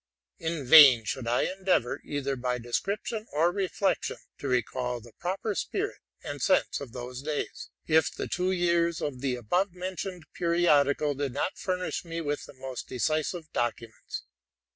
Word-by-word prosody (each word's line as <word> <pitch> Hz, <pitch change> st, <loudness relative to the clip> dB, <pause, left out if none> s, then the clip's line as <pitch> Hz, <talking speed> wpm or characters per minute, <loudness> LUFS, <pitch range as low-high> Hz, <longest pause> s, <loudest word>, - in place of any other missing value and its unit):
In 160 Hz, -3 st, -3 dB
vain 135 Hz, -4 st, +9 dB
should 115 Hz, +3 st, -3 dB
I 120 Hz, +1 st, +2 dB
endeavor, 185 Hz, -9 st, 0 dB
either 140 Hz, -1 st, -2 dB
by 125 Hz, 0 st, -1 dB
description 200 Hz, -, -2 dB
or 165 Hz, +4 st, +3 dB
reflection, 195 Hz, +1 st, 0 dB, 0.2 s
to 140 Hz, -, -4 dB
reeall 125 Hz, 0 st, 0 dB
the 115 Hz, -1 st, -15 dB
proper 195 Hz, +4 st, -2 dB
spirit -, -, -2 dB, 0.2 s
and -, -, -5 dB
sense -, -, +2 dB
of 135 Hz, -4 st, -7 dB
those 125 Hz, +1 st, -6 dB
days, 150 Hz, 0 st, -4 dB, 0.2 s
if 160 Hz, -1 st, +4 dB
the -, -, -5 dB
two 180 Hz, +1 st, 0 dB
years 170 Hz, -2 st, +2 dB
of 130 Hz, -4 st, -4 dB
the 135 Hz, -2 st, 0 dB
above 175 Hz, -, 0 dB
mentioned 180 Hz, -1 st, -5 dB
periodical 150 Hz, -4 st, +3 dB
did 140 Hz, -2 st, -3 dB
not 185 Hz, -, -2 dB
furnish 180 Hz, -1 st, -2 dB
me 165 Hz, -1 st, -5 dB
with 145 Hz, -2 st, -2 dB
the -, -, -13 dB
most 130 Hz, -1 st, -6 dB
decisive 155 Hz, +5 st, -1 dB
documents. 115 Hz, -1 st, -3 dB
150 Hz, 155 wpm, -28 LUFS, 125-175 Hz, 0.2 s, vain